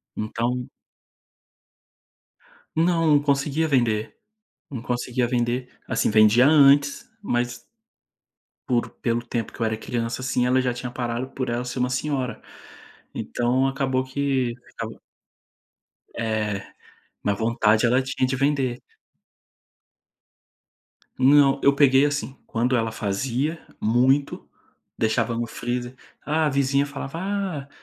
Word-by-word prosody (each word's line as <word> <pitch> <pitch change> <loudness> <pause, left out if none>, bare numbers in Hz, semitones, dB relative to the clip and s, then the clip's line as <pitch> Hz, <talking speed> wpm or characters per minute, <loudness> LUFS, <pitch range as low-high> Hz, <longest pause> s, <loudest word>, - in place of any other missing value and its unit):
Então 120 +3 -2 2.1
Não, 165 -3 +3
conseguia 145 +2 +1
vender, 115 -6 +1 0.6
não 125 -5 -6
conseguia 125 0 -1
vender, 120 +1 -1 0.2
assim, - - +1
vendia 110 +4 +6
antes, 140 -1 +5
mas 120 - -2 1.1
por 120 -2 +1
pelo 120 0 0
tempo 115 -2 -3
que - - -13
eu - - +2
era 110 0 -1
criança, 115 +2 -3
assim, 130 -1 0
ela 130 +1 +3
já 125 -1 0
tinha 125 0 -6
parado, 120 +1 -3
por 130 -2 -4
ela 120 +1 -2
ser 125 +1 -4
uma 125 0 +1
senhora. 130 -2 -2 0.7
Então, 125 +2 0
acabou 135 -1 0
que 130 -2 -1
ficava - - -8 1.2
É, 110 -3 -1 0.6
mas 100 -1 0
vontade 110 -1 +2
ela 125 +3 +3
tinha 130 0 -1
de 130 - -1
vender. 135 -3 0 2.4
Não, 140 +1 +5
eu 140 0 +5
peguei 140 0 +5
assim, 145 -2 -2
quando 125 +3 0
ela 115 -2 0
fazia 125 +10 -2 0.2
muito, 130 +6 +1 0.5
deixava 115 +1 0
no 120 +1 -1
freezer, 120 +2 -4 0.3
ah, 155 +2 0
a - - +2
vizinha 140 0 +1
falava: 140 +2 -6
"Ah, 190 -8 -3
125 Hz, 120 wpm, -24 LUFS, 120-140 Hz, 2.4 s, vendia